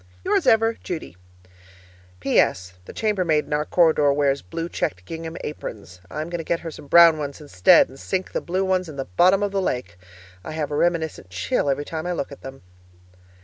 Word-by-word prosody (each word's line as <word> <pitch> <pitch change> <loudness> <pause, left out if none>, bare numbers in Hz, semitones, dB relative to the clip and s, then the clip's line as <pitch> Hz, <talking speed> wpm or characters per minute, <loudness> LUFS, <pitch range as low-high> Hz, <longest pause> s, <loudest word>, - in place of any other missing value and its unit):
Yours - - +1
ever, 225 0 +4
Judy 160 - -6 1.1
PS. 90 0 +1
The - - -9
chamber 210 -4 0
maid 155 -3 +1
in - - -5
our 150 0 0
corridor 160 -5 +3
wears 140 -1 +1
blue 165 - -5
checked 90 - -3
gingham 165 - -6
aprons. 100 -10 -8
I 150 - -4
am 160 - -8
going 175 - -3
to - - -4
get 165 +1 -1
her 165 - -6
some 145 - -12
brown 170 0 +7
ones 145 0 -5
instead, 140 -12 +4
and 135 +1 -15
sink 190 -1 -3
the - - -2
blue 185 +2 -1
ones 185 -2 0
in 150 - -9
the 135 -1 -4
bottom 185 - +3
of 205 - -1
the 195 -1 0
lake. 90 - -3 0.4
I 155 - -7
have 155 -2 -3
a - - -1
reminiscent 160 - -1
chill 90 +9 -1
every 140 +2 -1
time 160 +2 -5
I 180 - -1
look 155 - -4
at 140 - -11
them. 135 -5 -10
155 Hz, 210 wpm, -23 LUFS, 135-175 Hz, 1.1 s, brown